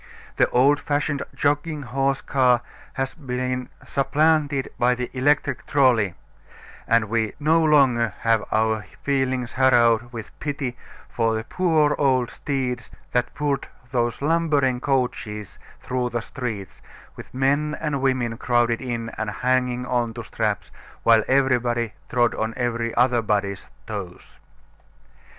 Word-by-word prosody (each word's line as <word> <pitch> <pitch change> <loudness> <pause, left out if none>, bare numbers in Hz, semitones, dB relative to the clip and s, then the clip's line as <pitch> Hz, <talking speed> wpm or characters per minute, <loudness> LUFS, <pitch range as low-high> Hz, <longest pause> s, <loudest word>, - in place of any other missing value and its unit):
The - - +4
old 140 +4 +4
fashioned, 145 -1 -1
jogging 145 +1 0
horse 135 +2 0
car 125 -3 +3 0.3
has 135 0 -2
been 125 -2 -3 0.2
supplanted 145 0 +1
by 125 0 +3
the 125 0 -4
electric 135 0 +1
"trolley," 120 -10 +3 0.7
and 115 -1 +3
we 110 0 -1
no 160 +2 +3
longer 130 -8 +3
have 115 -2 +2
our 110 0 +1 0.2
feelings 130 -3 0
harrowed 120 -3 +3
with 115 -3 -7
pity 140 -4 -3 0.3
for 115 -1 0
the 110 - -2
poor 155 0 +2
old 130 -4 +2
steeds 125 -4 -3 0.2
that 125 -1 0
pulled 145 -2 -1 0.2
those 120 0 -1
lumbering 145 -5 +2
coaches 125 -6 -2 0.2
through 125 -1 -2
the 120 -1 -2
streets, 115 -7 -6 0.3
with - - -11
men 145 +4 +1
and 150 -4 -2
women 125 -4 0
crowded 120 -1 +1
in 120 -3 -3
and 110 -1 -1
hanging 125 +2 0
on 120 -2 -1
to 120 - -6
straps, 110 -2 -2 0.3
while 115 -1 +5
everybody 125 -4 +1 0.2
trod 120 -1 +2
on 110 +1 -3
every 115 -1 -1
other 120 -1 +3
body's 100 -2 -1 0.2
toes. 100 -5 -8
125 Hz, 130 wpm, -23 LUFS, 115-140 Hz, 0.7 s, while